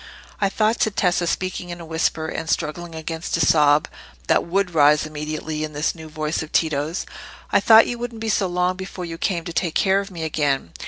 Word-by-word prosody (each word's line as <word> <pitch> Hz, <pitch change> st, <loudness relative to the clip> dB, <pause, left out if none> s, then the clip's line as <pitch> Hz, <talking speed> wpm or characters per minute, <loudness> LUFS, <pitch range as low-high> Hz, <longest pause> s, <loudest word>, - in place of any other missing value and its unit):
"I 195 Hz, -, +2 dB
thought," 215 Hz, +3 st, +1 dB
said 215 Hz, -2 st, +1 dB
Tessa, 180 Hz, -2 st, +1 dB
speaking 185 Hz, 0 st, -2 dB
in 175 Hz, 0 st, -6 dB
a 170 Hz, -, -8 dB
whisper, 160 Hz, 0 st, -1 dB
and 160 Hz, 0 st, -5 dB
struggling 165 Hz, +2 st, -2 dB
against 160 Hz, +1 st, -3 dB
a -, -, -3 dB
sob 150 Hz, 0 st, +4 dB, 0.4 s
that -, -, +3 dB
would 185 Hz, +1 st, -1 dB
rise 150 Hz, -1 st, +5 dB
immediately 155 Hz, 0 st, -4 dB
at 155 Hz, 0 st, -5 dB
this 150 Hz, +2 st, 0 dB
new 160 Hz, -2 st, -11 dB
voice 155 Hz, 0 st, -2 dB
of 160 Hz, -, -7 dB
Tito's—"I 155 Hz, +2 st, -1 dB
thought 225 Hz, -1 st, +7 dB
you 240 Hz, -, -4 dB
wouldn't 240 Hz, -1 st, -5 dB
be 225 Hz, -, -3 dB
so 200 Hz, -2 st, +1 dB
long 180 Hz, +1 st, 0 dB
before 190 Hz, -1 st, -6 dB
you 165 Hz, -1 st, -7 dB
came 175 Hz, -4 st, -1 dB
to 170 Hz, -, -5 dB
take 170 Hz, -2 st, -1 dB
care 195 Hz, 0 st, +3 dB
of 200 Hz, 0 st, -5 dB
me 170 Hz, -4 st, -6 dB
again. 145 Hz, -, -1 dB
165 Hz, 210 wpm, -22 LUFS, 155-185 Hz, 0.4 s, thought